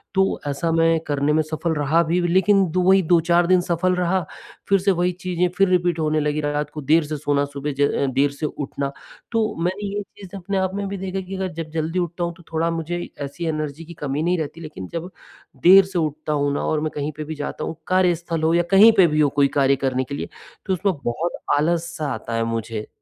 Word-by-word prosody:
तो 190 0 +2
ऐसा 145 +4 -1
मैं 165 0 +3
करने 145 0 +1
में 155 - +3
सफल 155 +2 -2
रहा 150 +3 +2
भी 170 +2 0
लेकिन 190 +2 +4
2 180 +2 +2
ही 195 0 +5
2-4 170 +1 +3
दिन 185 0 +4
सफल 175 +1 0
रहा। 180 +1 +1 0.5
फिर 195 0 +4
से 195 +2 +2
वही 180 0 +1
चीज़ें 180 -1 -1
फिर 195 - +4
रिपीट 175 -2 +1
होने 155 0 +1
लगी, 150 0 0
रात 145 0 -1
को 150 - -5
देर 155 +4 +3
से 150 +1 -4
सोना, 145 0 0
सुबह 140 +1 -5
ज - - +2
अ, 140 - +1
देर 140 +2 +2
से 140 +2 -5
उठना, 140 -1 -4 0.4
तो 225 -2 0
मैंने 190 +4 -2
ये 205 - -1 0.2
चीज़ 200 -1 -10
अपने 195 +1 -3
आप 190 0 0
में 200 0 -2
भी 200 0 -4
देखा 190 0 -4
कि 195 - -5
अगर 190 -1 -3
जब 160 0 -6
जल्दी 165 +2 -1
उठता 175 0 -2
हूँ, 170 0 -2
तो 175 - -16
थोड़ा 165 +1 +1
मुझे 165 +1 -3 0.2
ऐसी 140 +5 -5
एनर्जी 155 0 -3
की 170 - -10
कमी 145 +2 -1
नहीं 180 +2 +1
रहती, 160 +1 -5
लेकिन 150 - -8
जब 170 +2 -4 0.5
देर 190 +2 +8
से 190 -2 -3
उठता 155 -1 -2
हूँ 145 -1 0
ना - - -2
और 155 - 0
मैं 155 0 -2
कहीं 145 +1 -2
पे 155 - -4
भी 160 +1 -6
जाता 145 0 -5
हूँ, - - -4
कार्यस्थल 175 -3 +1
हो 160 +1 +3
या 175 0 +3
कहीं 205 +4 +8
पे 185 -3 +7
भी 150 -1 0
हो, 145 - +4
कोई 140 0 +3
कार्य 135 0 +4
करने 130 0 0
के 140 +2 -6
लिए, - - -5 0.4
तो 190 - 0
उसमें 190 +1 0
बहुत 140 +9 -1 0.3
आलस 165 +3 +1
सा 155 - -3
आता 115 - -6
है 115 0 +1
मुझे, 115 -1 -4
165 Hz, 240 wpm, -22 LUFS, 150-180 Hz, 0.5 s, देर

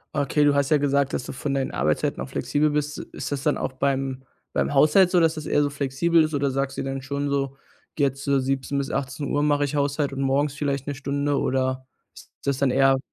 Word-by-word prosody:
Okay, 145 +1 +2
du 145 -1 +4
hast 140 +1 +1
ja 155 - +6
gesagt, 140 -1 +1
dass - - -1
du - - -6
von 140 +1 -3
deinen 135 -1 0
Arbeitszeiten - - 0
auch - - -5
flexibel 150 +1 0
bist. 150 0 -1 0.2
Ist - - -5
das 140 -1 -3
dann 150 - +2
auch 130 - -3
beim 135 -1 -1 0.3
beim - - 0
Haushalt 180 +6 +5
so, 180 - +4
dass 165 -1 +3
das 155 - -6
eher 145 - +2
so 145 - +1
flexibel 145 +4 +2
ist 155 - -2
oder 140 -1 +1
sagst 135 +1 -2
du - - -1
dir 135 - -3
dann 135 0 -4
schon 140 +1 -2
so, 135 -1 -1 0.4
jetzt, 140 0 0
äh: 140 -1 +3
„17:00 135 +1 -1
bis 135 - -3
18:00, 140 +2 -2
mache 145 -1 +2
ich 145 - -4
Haushalt 145 0 0
und 135 - -4
morgens 140 +1 +1
vielleicht 140 -1 -2
'ne 145 - -2
Stunde“ 140 +1 -1
oder 130 0 0 0.3
ist - - -14 0.2
das 140 -1 +1
dann 135 -1 +2
eher 135 0 +4
140 Hz, 240 wpm, -24 LUFS, 135-145 Hz, 0.4 s, ja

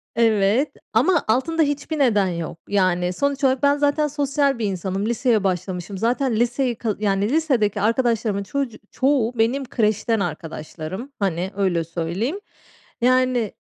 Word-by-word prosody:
Evet, 225 +3 +3 0.2
ama 375 -2 +3
altında 265 +9 +1
hiçbir 290 +1 -2
neden 210 -8 +3
yok. 170 -2 -4
Yani, 185 -3 +1
sonuç 280 +7 -1
olarak 265 0 +2
ben 285 0 +4
zaten 290 +1 +2
sosyal 280 -2 0
bir 220 - 0
insanım. 190 0 -2
Liseye 235 -2 +1
başlamışım. 185 0 -3
Zaten 245 +4 0
liseyi, 245 +2 +1
ka 220 -2 -2
yani, 200 0 +1
lisedeki 250 -10 +1
arkadaşlarımın 225 -3 +1
çocu 260 +2 -3
çoğu 260 -3 +1
benim 255 +5 +1
kreşten 220 -2 0
arkadaşlarım. 165 - -5
Hani, 190 -1 -1
öyle 185 -4 +1
söyleyeyim. 175 - -3 0.6
Yani 255 -3 +2
225 Hz, 135 wpm, -22 LUFS, 195-270 Hz, 0.6 s, ben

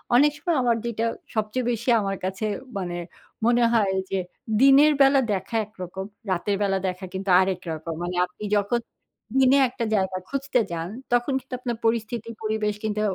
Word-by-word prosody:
অনেক 290 +4 +6
সময় 330 0 0
আমার 235 -1 +3
যেটা 230 -1 -1 0.3
সবচেয়ে 220 +3 -1
বেশি 235 +2 -2
আমার 195 -1 -2
কাছে 190 +3 -2 0.3
মানে, 175 -2 -3 0.5
মনে 240 0 +4
হয় 205 -4 +3 0.2
যে 195 - +1 0.4
দিনের 275 +3 +7
বেলা 275 0 +6
দেখা 200 +4 -4
একরকম। 190 -2 -7 0.3
রাতের 195 +3 0
বেলা 195 -1 +2
দেখা 185 +1 -4
কিন্তু 190 +1 -4
আরেক 185 -1 -1
রকম। 160 +1 -4
মানে 180 +1 -3
আপনি 180 +3 -13
যখন 205 +4 +1 0.6
দিনে 265 +1 +6
একটা 245 -2 -3
জায়গা 190 -1 0
খুঁজতে 275 -2 0
যান, 165 0 -3 0.2
তখন 245 +3 +2
কিন্তু 260 0 -13
আপনার 240 -3 -3
পরিস্থিতি 230 0 -1
পরিবেশ 215 -1 0
কিন্তু 210 -1 -1
215 Hz, 165 wpm, -25 LUFS, 190-245 Hz, 0.6 s, দিনের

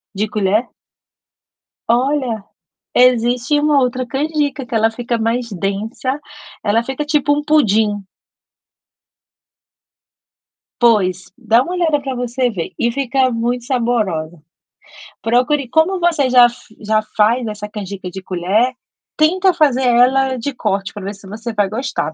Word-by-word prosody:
De 210 +2 -1
colher? 210 +3 0 1.2
Olha, 245 -3 0 0.5
existe 250 +3 +3
uma 295 -1 +3
outra 255 0 -1
canjica 290 +1 -2
que 245 - -7
ela 225 0 +3
fica 235 +1 -3
mais 230 +1 -1
densa, 210 +8 -3 0.5
ela 220 +2 +2
fica 265 +4 -4
tipo 295 -1 +1
um 295 - -1
pudim. 215 -9 +2 2.8
Pois, 190 -7 +2
dá 230 -1 +3
uma 345 +7 -4
olhada 320 -5 +1
para 265 -2 -4
você 245 +1 -1
ver, 180 -7 -5
e 235 - +1
fica 265 0 +1
muito 240 +1 -2
saborosa. 215 - -1 0.9
Procure 250 +4 +1
como 335 +7 +2
você 330 -6 +2
já 250 -1 +7
f 240 0 -1 0.2
já 215 0 +1 0.2
faz 230 +4 +3
essa 210 0 -5
canjica 200 -3 -7
de 190 - -7
colher, 190 +7 0 0.4
tenta 370 +5 +3
fazer 285 -6 +2
ela 260 +2 +3
de 270 +4 -4
corte, 195 -5 -2
para 205 - -8
ver 200 +2 -5
se 195 0 -15
você 220 +4 -6
vai 205 -2 +1
gostar 225 - -3
240 Hz, 135 wpm, -17 LUFS, 215-270 Hz, 2.8 s, já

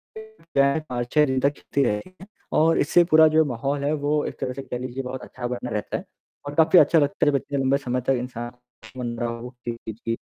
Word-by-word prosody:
फिर 440 0 -13
क्या 140 0 +5
है, 160 - 0
5-6 125 +5 +1
दिन 130 -2 0
तक 140 - +3
चलती 140 - -1
रहेगी 135 - -3 0.3
और 165 +1 +4
इससे 175 +4 +4
पूरा 160 0 +8
जो 160 - +6
माहौल 140 +3 -2
है 145 +2 +1
वो 150 0 +1
एक - - -6
तरह 125 - -2
से 135 - -6
कह 125 -2 -5
लीजिए 130 +1 -5
बहुत 125 +1 -6
अच्छा 120 -1 -6
बना 125 0 -4
रहता 105 - -2
है - - -8 0.4
और 145 - -5
काफ़ी 160 +3 +6
अच्छा 155 +3 +5
लगता 145 0 +1
है 145 - +5
जब - - 0
इतने 140 +1 -4
लंबे 135 +1 +2
समय 125 -2 -2
तक 135 - +4
इंसान 120 -1 -6 0.5
मनाओ 120 0 -4 0.2
कि 120 -1 -3
जी। 115 +1 -4
135 Hz, 225 wpm, -24 LUFS, 120-145 Hz, 0.5 s, पूरा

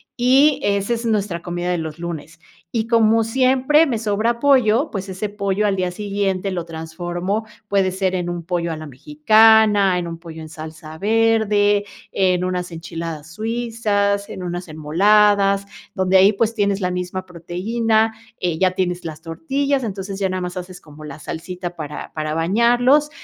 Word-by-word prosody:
y 270 +4 +4
ese 200 +2 0
es 235 0 -4
nuestra 205 -6 -1
comida 175 0 -4
de 180 - 0
los 160 -1 -5
lunes. 170 -1 -7 0.3
Y 225 -1 -1
como 225 -1 +3
siempre 260 +6 +3
me 255 -7 -1
sobra 220 +2 0
pollo, 260 0 +3
pues 195 -1 -5
ese 190 +3 -3
pollo 205 0 -1
al 200 - +1
día 180 -1 -1
siguiente 195 -1 -2
lo 175 -2 -3
transformo, 175 +5 -4 0.2
puede 195 -2 +1
ser 190 0 -1
en 175 -1 -2
un 175 -1 -4
pollo 170 -1 -1
a 160 - -4
la 155 - -8
mexicana, 215 - +4
en 170 - -4
un 165 0 -6
pollo 165 -1 -10
en 160 - -8
salsa 155 0 -10
verde, 210 0 +2 0.3
en 180 -2 +2
unas 180 -1 -3
enchiladas 165 -1 -7
suizas, 215 -2 -1
en - - -7
unas 175 0 -5
enmoladas, 200 +5 +3 0.3
donde 190 0 +1
ahí, 190 +2 +7
pues, 220 +2 0
tienes 200 -2 +1
la 180 -2 -1
misma 180 +1 -4
proteína, 220 +6 0 0.3
eh, 175 -3 -1
ya 185 +1 +3
tienes 180 -1 -2
las 160 -1 -7
tortillas, 275 - -1
entonces, 195 -2 -5
ya 195 -1 0
nada 185 0 -2
más 180 0 -5
haces 180 0 -7
como 155 -2 -14
la 150 - -9
salsita 175 +3 -6
para 150 -2 -7
para 155 -1 -3
bañarlos, 240 - +3
195 Hz, 170 wpm, -20 LUFS, 175-220 Hz, 0.3 s, ahí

